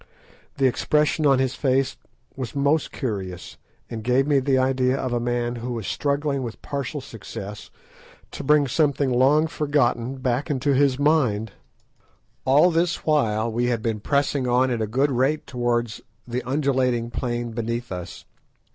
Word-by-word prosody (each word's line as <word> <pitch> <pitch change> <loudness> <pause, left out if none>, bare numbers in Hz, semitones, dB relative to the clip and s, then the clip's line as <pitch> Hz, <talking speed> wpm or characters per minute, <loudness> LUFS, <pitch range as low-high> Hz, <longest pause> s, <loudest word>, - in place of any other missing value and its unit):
The 135 - +2
expression 150 +4 +2
on 135 -1 +5
his 130 -1 0
face 130 0 +1 0.4
was 130 0 -6
most 145 +2 +1
curious, 95 -8 -5 0.3
and 110 -1 -6
gave 125 +3 +2
me 145 -1 +3
the 135 0 +1
idea 130 0 +2
of 130 -2 -2
a 120 - +1
man 120 0 -1
who 120 +1 -4
was 115 -4 -5
struggling 140 +1 -1
with 120 -3 -6
partial 140 +1 -4
success 105 -3 -8 0.6
to - - -6
bring 145 0 +4
something 140 0 +1
long 135 +5 +4
ago 160 - -2
forgotten 135 -5 0
back 130 +1 -1
into 140 0 +1
his 135 -1 +3
mind. 130 -8 +2 0.9
All 145 +7 +5
this 170 +1 0
while 115 -7 +1
we 120 +2 0
had 120 -3 -1
been 110 -2 -1
pressing 140 +2 0
on 125 +1 +2
at 120 -2 -1
a 110 - 0
good 135 +6 +1
rate 135 +5 +1
towards 120 -3 -1 0.3
the 125 +1 -2
undulating 130 -4 0
plain 120 0 -3
beneath 115 0 -3
us. 90 -2 -7
130 Hz, 160 wpm, -23 LUFS, 120-140 Hz, 0.9 s, on